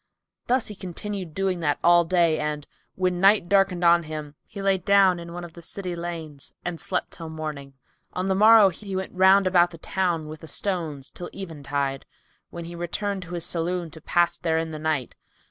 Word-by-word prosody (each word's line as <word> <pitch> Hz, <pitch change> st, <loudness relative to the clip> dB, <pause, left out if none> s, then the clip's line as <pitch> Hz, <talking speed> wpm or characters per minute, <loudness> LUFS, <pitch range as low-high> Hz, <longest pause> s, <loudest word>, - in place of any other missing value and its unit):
Thus 250 Hz, -1 st, +2 dB
he 210 Hz, -, -8 dB
continued 185 Hz, -2 st, -6 dB
doing 190 Hz, -3 st, -1 dB, 0.2 s
all 175 Hz, 0 st, +6 dB
that -, -, -15 dB
day 170 Hz, -3 st, +3 dB
and, 150 Hz, -1 st, -3 dB, 0.3 s
when 180 Hz, -1 st, 0 dB
night 195 Hz, -2 st, +5 dB
darkened 195 Hz, -2 st, +2 dB
on 170 Hz, 0 st, +6 dB
him, 155 Hz, -2 st, -7 dB
he -, -, -9 dB
lay 195 Hz, -1 st, +2 dB
down 195 Hz, -1 st, +4 dB
in 170 Hz, 0 st, -8 dB
one 175 Hz, +1 st, -6 dB
of 170 Hz, -1 st, -9 dB
the 170 Hz, -, -12 dB
city 180 Hz, +1 st, -5 dB
lanes 165 Hz, -4 st, -7 dB
and 175 Hz, -2 st, -3 dB
sleet -, -, -1 dB
till 165 Hz, -1 st, -8 dB
morning 150 Hz, -3 st, -6 dB, 0.4 s
On 185 Hz, +1 st, -2 dB
the 190 Hz, -, +2 dB
morrow, 215 Hz, +1 st, +7 dB
he 195 Hz, +2 st, -7 dB
went 190 Hz, 0 st, -4 dB
round 190 Hz, +1 st, +5 dB
about 175 Hz, -2 st, +3 dB
town 175 Hz, -5 st, -1 dB
with 155 Hz, 0 st, -8 dB
the 160 Hz, -, -11 dB
stones 160 Hz, -6 st, -2 dB
till 175 Hz, -, -7 dB
eventide, 140 Hz, -6 st, -3 dB, 0.4 s
when 170 Hz, -1 st, -7 dB
he 170 Hz, -, -8 dB
returned 190 Hz, +4 st, -3 dB
to 175 Hz, 0 st, -7 dB
his 170 Hz, -1 st, -4 dB
saloon 170 Hz, 0 st, -2 dB
to 160 Hz, -, -12 dB
pass 175 Hz, +2 st, +1 dB
therein 160 Hz, -1 st, 0 dB
the 155 Hz, -, -6 dB
night. 155 Hz, -5 st, -1 dB
175 Hz, 195 wpm, -25 LUFS, 160-190 Hz, 0.4 s, morrow